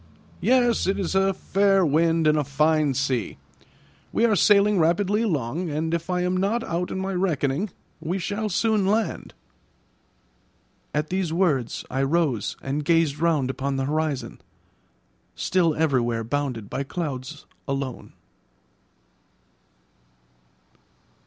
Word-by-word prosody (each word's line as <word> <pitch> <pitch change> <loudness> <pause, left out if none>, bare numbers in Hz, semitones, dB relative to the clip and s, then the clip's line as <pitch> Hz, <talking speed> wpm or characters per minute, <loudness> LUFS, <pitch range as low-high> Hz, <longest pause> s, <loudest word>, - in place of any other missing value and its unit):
"Yes, 245 0 +3
it 195 +1 +1
is 190 -2 -2
a 195 0 +3
fair 195 0 +2
wind 165 +2 +2
and 155 0 +4
a 150 - +1
fine 150 +1 +1
sea; 130 -4 -1 0.7
we 230 - +2
are 220 -3 +3
sailing 205 0 +4
rapidly 190 +6 +2
along, 160 - -1
and 160 +2 -2
if 170 +1 -2
I 180 0 0
am 180 +1 0
not 205 +5 0
out 175 +2 -2
in - - -4
my 190 +1 -2
reckoning, 175 -1 0 0.3
we 165 +4 -2
shall 205 +4 -3
soon 210 0 +1
land." 210 -3 -1 1.6
At 150 +2 -2
these 185 -3 -1
words 160 -9 0
I 135 - 0
rose 135 -5 0
and 140 +3 -2
gazed 160 -2 +2
round 155 -6 +1
upon 135 +1 -3
the 135 0 -1
horizon, 150 -1 -2 0.9
still 170 -4 +1
everywhere 120 -7 +1
bounded 125 -3 -3
by 130 +5 -4
clouds 140 -1 -5 0.2
alone. 135 -2 -4
165 Hz, 125 wpm, -24 LUFS, 140-190 Hz, 1.6 s, and